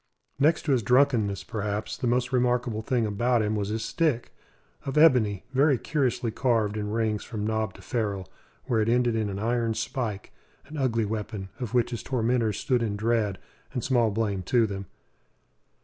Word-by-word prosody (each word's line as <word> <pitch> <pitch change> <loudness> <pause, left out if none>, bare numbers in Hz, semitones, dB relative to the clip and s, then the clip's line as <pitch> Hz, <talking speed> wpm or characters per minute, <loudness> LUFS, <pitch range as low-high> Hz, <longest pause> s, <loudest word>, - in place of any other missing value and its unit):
Next 155 +3 +3
to 150 - 0
his 130 -3 +3
drunkenness, 120 -4 +2
perhaps, 105 0 -3
the 130 - -2
most 125 +2 +1
remarkable 120 -3 +1
thing 120 0 0
about 115 +3 +1
him 105 +1 0
was 100 -1 -2
his 110 +1 -2
stick 150 -7 0 0.5
of 135 +1 -3
ebony, 125 - +4
very 140 0 +4
curiously 125 -5 -1
carved 115 -4 +1
in 105 -1 -3
rings 110 -1 0
from 105 -3 -4
knob 110 -2 -1
to - - -14
ferrule, 100 -6 -2 0.4
where 115 -2 +1
it 110 - +1
ended 120 -1 +2
in 110 -2 0
an 95 - -4
iron 115 +1 0
spike; 115 -2 -3 0.3
an 155 - -10
ugly 120 -6 +1
weapon, 105 -2 -4
of 125 -1 -4
which 120 0 +2
his 120 -3 -4
tormentors 120 -3 0
stood 125 -4 +1
in 105 -3 -1
dread, 110 -2 0 0.4
and 125 - -2
small 120 -4 +3
blame 100 -2 -1
to 115 +5 +2
them. 100 -2 -5
115 Hz, 180 wpm, -27 LUFS, 105-125 Hz, 0.5 s, ebony